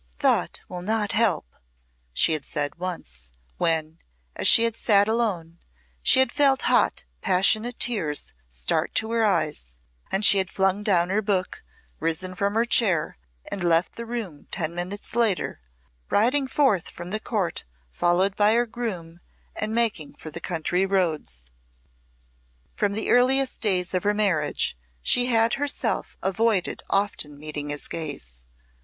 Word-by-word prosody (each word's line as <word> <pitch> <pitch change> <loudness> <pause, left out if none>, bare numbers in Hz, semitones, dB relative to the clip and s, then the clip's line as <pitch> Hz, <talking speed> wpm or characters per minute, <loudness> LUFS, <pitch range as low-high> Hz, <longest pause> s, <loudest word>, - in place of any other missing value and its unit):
"Thought - - +1
will 180 -1 -7
not 210 +1 0
help," 220 -5 +1 0.7
she 160 - +3
had 155 -2 0
said 145 +3 -3
once, 60 - -6 0.3
when, 160 0 0 0.4
as - - +1
she 230 - +8
had 230 -1 0
sate 205 -3 +3
alone, 190 -8 -2 0.4
she - - +5
had 260 -2 +4
felt 275 -2 +3
hot, - - +2 0.2
passionate 215 +6 +2
tears 175 -12 +1 0.2
start 60 0 -2
to 220 0 +1
her 230 -1 +1
eyes, 150 - -1 0.3
and 195 +2 +2
she 200 -1 +7
had 190 -1 -2
flung 195 +1 0
down 180 -4 +2
her 210 +2 +1
book, 195 -3 -2 0.4
risen 165 +3 -1
from 200 +2 -2
her 230 +1 +2
chair, 185 - +2 0.3
and 190 - -4
left 170 0 +2
the 235 0 -7
room 220 -11 -6
ten 170 -2 -2
minutes 180 +6 -4
later, 225 - 0 0.5
riding 260 +6 +2
forth 260 - +1
from 175 +1 -9
the 215 - -1
court 205 -7 -2 0.3
followed 180 - +1
by 210 +1 +3
her 240 +1 +2
groom 185 -8 -6 0.4
and 215 +1 -3
making 220 -9 0
for 155 - -10
the 170 - -7
country 175 +1 -1
roads. 155 - -2 1.2
From 205 -1 -1
the 220 - -1
earliest 260 +2 +3
days 185 -5 +1
of 185 - 0
her 205 0 +2
marriage 185 - +1 0.3
she 245 0 +3
had 230 -1 +3
herself 285 0 -1
avoided 200 -1 0
often 195 -7 -1
meeting 150 0 -6
his 145 0 -2
gaze. 100 - -5
195 Hz, 150 wpm, -24 LUFS, 165-225 Hz, 1.2 s, she